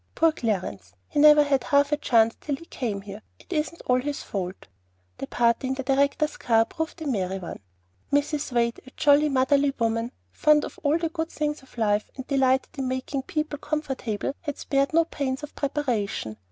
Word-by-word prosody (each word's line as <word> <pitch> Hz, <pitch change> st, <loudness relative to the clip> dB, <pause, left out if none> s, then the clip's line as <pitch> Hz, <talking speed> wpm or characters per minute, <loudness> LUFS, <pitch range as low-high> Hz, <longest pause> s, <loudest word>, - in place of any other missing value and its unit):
Poor 330 Hz, 0 st, +4 dB
Clarence! 185 Hz, -, -3 dB
he -, -, -1 dB
never 300 Hz, 0 st, +8 dB
had 275 Hz, -3 st, +1 dB
half 285 Hz, 0 st, +3 dB
a -, -, +4 dB
chance 230 Hz, -5 st, +3 dB
till 290 Hz, -, -2 dB
he 335 Hz, -, -13 dB
came 220 Hz, -10 st, -3 dB
here. 200 Hz, +1 st, -9 dB, 0.2 s
It -, -, -9 dB
isn't 320 Hz, +2 st, -2 dB
all 250 Hz, 0 st, +3 dB
his 285 Hz, +2 st, -4 dB
fault." 185 Hz, -2 st, -5 dB, 0.5 s
The 135 Hz, -, -4 dB
party 235 Hz, +2 st, +1 dB
in 260 Hz, -, 0 dB
the 270 Hz, -, -4 dB
director's 280 Hz, +3 st, +1 dB
car 225 Hz, -1 st, +3 dB
proved 320 Hz, +6 st, -5 dB
a -, -, -6 dB
merry 195 Hz, -8 st, -1 dB
one. 180 Hz, -3 st, -7 dB, 0.5 s
Mrs. 290 Hz, 0 st, 0 dB
Wade, 235 Hz, -1 st, +1 dB
a -, -, -11 dB
jolly, 295 Hz, +1 st, +5 dB
motherly 275 Hz, +1 st, +2 dB
woman, 230 Hz, +1 st, 0 dB, 0.2 s
fond 300 Hz, -, +4 dB
of -, -, -10 dB
the 320 Hz, +3 st, +2 dB
good 320 Hz, -1 st, -2 dB
things 300 Hz, -2 st, -2 dB
of 265 Hz, -, -20 dB
life, 210 Hz, -2 st, +1 dB
and 260 Hz, -, -7 dB
delighting 265 Hz, -2 st, +2 dB
in -, -, -2 dB
making 260 Hz, +1 st, -2 dB
people 305 Hz, +1 st, -3 dB
comfortable, 270 Hz, -8 st, -3 dB
had 290 Hz, -3 st, -4 dB
spared 275 Hz, 0 st, 0 dB
no 330 Hz, +1 st, +4 dB
pains 275 Hz, -3 st, -3 dB
of 295 Hz, -, -7 dB
preparation. 235 Hz, -, -2 dB
270 Hz, 190 wpm, -25 LUFS, 230-295 Hz, 0.5 s, never